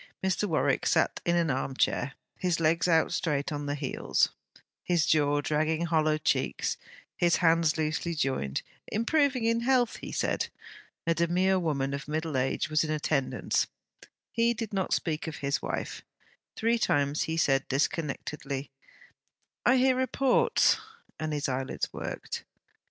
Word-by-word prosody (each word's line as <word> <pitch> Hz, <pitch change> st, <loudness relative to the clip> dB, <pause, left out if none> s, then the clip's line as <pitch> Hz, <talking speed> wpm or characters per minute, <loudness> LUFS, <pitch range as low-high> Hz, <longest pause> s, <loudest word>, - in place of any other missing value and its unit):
Mr. 190 Hz, +2 st, +1 dB
Warwick 145 Hz, -4 st, +1 dB
sat -, -, +2 dB
in 170 Hz, -, +2 dB
an 170 Hz, -3 st, +2 dB
arm 130 Hz, +1 st, -2 dB
chair, 135 Hz, +2 st, +1 dB, 0.2 s
his 180 Hz, -2 st, 0 dB
legs 165 Hz, +2 st, +2 dB
out 165 Hz, -2 st, +3 dB
straight 145 Hz, -2 st, -1 dB
on 145 Hz, -1 st, -3 dB
the 145 Hz, -, -1 dB
heels, 140 Hz, -3 st, 0 dB, 0.5 s
his 170 Hz, -3 st, +1 dB
jaw 145 Hz, -1 st, +3 dB
dragging 155 Hz, +3 st, 0 dB
hollow 155 Hz, -2 st, +2 dB
cheeks, 155 Hz, -, 0 dB, 0.4 s
his 175 Hz, -1 st, +3 dB
hands 165 Hz, -2 st, +3 dB
loosely 160 Hz, +2 st, -1 dB
joined; 130 Hz, -, -1 dB, 0.2 s
improving 260 Hz, +2 st, +1 dB
in 230 Hz, 0 st, +2 dB
health, 245 Hz, -1 st, +2 dB
he -, -, -8 dB
said. -, -, 0 dB, 0.6 s
A 165 Hz, -, +3 dB
demure 180 Hz, +3 st, +2 dB
woman 140 Hz, -5 st, -1 dB
of 140 Hz, 0 st, -5 dB
middle 155 Hz, 0 st, -2 dB
age 130 Hz, 0 st, 0 dB
was 155 Hz, +1 st, +2 dB
in 155 Hz, -, -3 dB
attendance. 140 Hz, -4 st, 0 dB, 0.6 s
He 235 Hz, +1 st, +2 dB
did 225 Hz, -2 st, -5 dB
not 190 Hz, -1 st, -1 dB
speak 160 Hz, -2 st, -1 dB
of 160 Hz, -, -4 dB
his 140 Hz, 0 st, -1 dB
wife. -, -, -4 dB, 0.5 s
Three 230 Hz, +1 st, +1 dB
times 145 Hz, -7 st, +1 dB
he 160 Hz, -, -1 dB
said 135 Hz, -4 st, +2 dB
disconnectedly, 140 Hz, -2 st, -2 dB, 1.0 s
'I 255 Hz, +2 st, +6 dB
hear 260 Hz, 0 st, +4 dB
reports,' 260 Hz, 0 st, +3 dB, 0.4 s
and 155 Hz, 0 st, -2 dB
his 145 Hz, -1 st, -1 dB
eyelids 130 Hz, 0 st, -3 dB
worked. -, -, -5 dB
160 Hz, 145 wpm, -29 LUFS, 145-180 Hz, 1.0 s, I